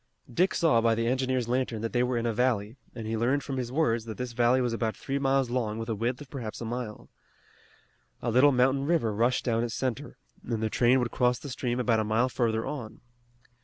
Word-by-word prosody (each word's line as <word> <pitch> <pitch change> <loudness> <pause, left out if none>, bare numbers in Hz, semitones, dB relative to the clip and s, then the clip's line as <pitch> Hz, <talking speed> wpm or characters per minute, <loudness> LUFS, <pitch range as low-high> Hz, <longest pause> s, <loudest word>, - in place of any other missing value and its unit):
Dick 185 +9 +2
saw 150 -9 +3
by 115 0 +3
the 115 +1 -1
engineer's 130 0 0
lantern 120 -3 -1
that 115 - -3
they 120 - +2
were 125 0 0
in 115 - -1
a 115 - 0
valley, 115 -2 0 0.2
and 115 -2 -6
he 110 +1 -2
learned 130 +6 +1
from 135 -2 -4
his 125 -2 -3
words 120 -6 +1
that 110 -2 -7
this 125 -1 -4
valley 120 +2 +3
was 120 -2 0
about 115 -1 -2
three 140 +1 -3
miles 135 -2 +1
long 115 -4 -1
with 115 +1 -5
a - - +1
width 120 +4 -2
of 145 - -10
perhaps 115 -7 -5
half 115 - -6
a 115 - -4
mile. 120 -3 -5 1.1
A 120 - -2
little 130 +5 +6
mountain 135 +2 +2
river 155 -11 +1
rushed 120 +4 +1
down 115 -2 +1
its 120 -1 -3
center, 130 +2 -3 0.3
and 115 -2 -3
the 110 - -1
train 125 +1 +4
would 125 -2 -1
cross 125 -1 +2
the 145 - -8
stream 125 -1 -2
about 115 -3 +2
a - - +1
mile 110 +4 +1
further 115 -3 0
on. 120 -8 -6
120 Hz, 240 wpm, -28 LUFS, 115-130 Hz, 1.1 s, little